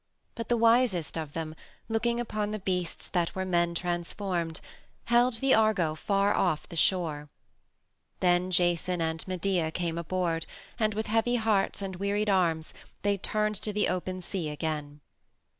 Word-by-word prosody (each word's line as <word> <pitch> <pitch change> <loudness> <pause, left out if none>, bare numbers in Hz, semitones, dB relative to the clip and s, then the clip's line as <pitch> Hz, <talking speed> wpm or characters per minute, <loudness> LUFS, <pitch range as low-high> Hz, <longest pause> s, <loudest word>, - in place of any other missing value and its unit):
But 230 -2 -6
the 240 - +3
wisest 230 -7 +3
of 155 -3 -4
them, 160 -1 -4 0.3
looking 235 +1 0
upon 215 -3 -2
the 215 - -2
beasts 180 -3 -2
that 175 -2 0
were 190 0 -1
men 175 -2 +1
transformed, 175 -1 -2 0.5
held 240 +1 +4
the 265 +3 +3
Argo 215 -8 +3
far 200 +5 +1
off 165 -5 +1
the 170 - -9
shore. 155 -4 +1 0.9
Then 180 0 +3
Jason 175 0 +1
and 160 -1 -1
Medea 185 -2 0
came 170 0 -2
aboard, 170 -1 -1 0.3
and 215 -2 +1
with 220 +1 -1
heavy 225 +3 +2
hearts 215 -4 +1
and 190 -2 -4
wearied 205 +2 0
arms 165 -4 +1 0.3
they 205 0 +3
turned 210 +1 -1
to 215 - -2
the 210 0 +1
open 185 0 -3
sea 175 -4 -3
again. 150 -1 -4
185 Hz, 155 wpm, -29 LUFS, 170-210 Hz, 0.9 s, held